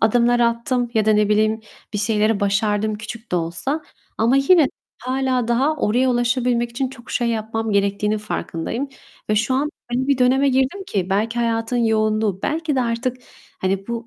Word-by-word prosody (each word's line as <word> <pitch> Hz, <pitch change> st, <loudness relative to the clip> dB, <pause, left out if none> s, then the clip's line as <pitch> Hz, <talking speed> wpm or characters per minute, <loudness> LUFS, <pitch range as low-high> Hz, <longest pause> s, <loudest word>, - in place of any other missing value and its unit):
adımlar 240 Hz, +2 st, +3 dB
attım 235 Hz, +1 st, +1 dB
ya 220 Hz, -1 st, +3 dB
da, 215 Hz, -, +5 dB
ne 210 Hz, -1 st, +3 dB
bileyim, 215 Hz, +1 st, +2 dB, 0.3 s
bir 205 Hz, -, -2 dB
şeyleri 215 Hz, 0 st, +1 dB
başardım 205 Hz, +1 st, +1 dB
küçük 220 Hz, +1 st, -9 dB
de -, -, +3 dB
olsa. 175 Hz, -, -1 dB, 0.4 s
Ama 235 Hz, +4 st, +3 dB
yine 300 Hz, +4 st, +5 dB
de -, -, 0 dB, 0.3 s
hâlâ 255 Hz, -2 st, 0 dB
daha 270 Hz, +6 st, +2 dB
oraya 255 Hz, 0 st, +2 dB
ulaşabilmek 240 Hz, 0 st, +1 dB
için 260 Hz, +2 st, -2 dB
çok 250 Hz, -3 st, -13 dB
şey 240 Hz, -1 st, 0 dB
yapmam 225 Hz, 0 st, -2 dB
gerektiğinin 200 Hz, +1 st, +1 dB
farkındayım 210 Hz, +5 st, -4 dB, 0.4 s
ve 215 Hz, -, +3 dB
şu 230 Hz, +5 st, +1 dB
an 290 Hz, +3 st, 0 dB, 0.2 s
öyle 260 Hz, +2 st, 0 dB
bir 280 Hz, -2 st, +3 dB
döneme 265 Hz, +2 st, +4 dB
girdim 265 Hz, +9 st, 0 dB
ki 190 Hz, -, -2 dB
belki 220 Hz, +4 st, 0 dB
hayatın 230 Hz, 0 st, 0 dB
yoğunluğu, 215 Hz, -3 st, +1 dB
belki 315 Hz, -2 st, -1 dB
de -, -, +3 dB
artık, 240 Hz, +2 st, -1 dB, 0.4 s
hani, 195 Hz, +1 st, -1 dB
bu 235 Hz, 0 st, -4 dB
235 Hz, 175 wpm, -21 LUFS, 215-255 Hz, 0.4 s, da